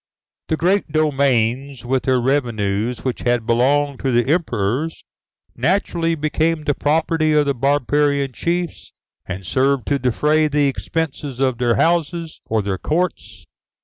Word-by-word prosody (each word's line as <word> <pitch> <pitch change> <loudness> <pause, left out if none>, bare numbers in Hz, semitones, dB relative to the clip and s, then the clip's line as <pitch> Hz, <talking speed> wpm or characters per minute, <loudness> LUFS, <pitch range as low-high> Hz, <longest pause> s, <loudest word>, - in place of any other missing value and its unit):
The 160 - 0
great 185 0 +1
domains, 135 -4 +1
with 130 +1 0
their 130 -1 +3
revenues 120 -4 -1
which 130 - -1
had 120 -2 0
belonged 135 +4 +2
to 135 - -1
the 120 +4 +2
emperors, 135 - -2 0.5
naturally 170 -3 0
became 155 +1 0
the 145 - +1
property 155 +2 +1
of 150 -1 +3
the 140 - +1
barbarian 140 +1 +1
chiefs, 175 +5 -3 0.3
and 95 0 -6
served 135 +3 +1
to 140 -1 +1
defray 150 +5 +2
the 145 -1 +1
expenses 140 -2 -3
of 130 -3 +1
their 120 -2 +2
houses 170 - 0
or 110 -1 0
their 95 -2 -2
courts. 175 +3 -2
140 Hz, 140 wpm, -20 LUFS, 125-155 Hz, 0.5 s, their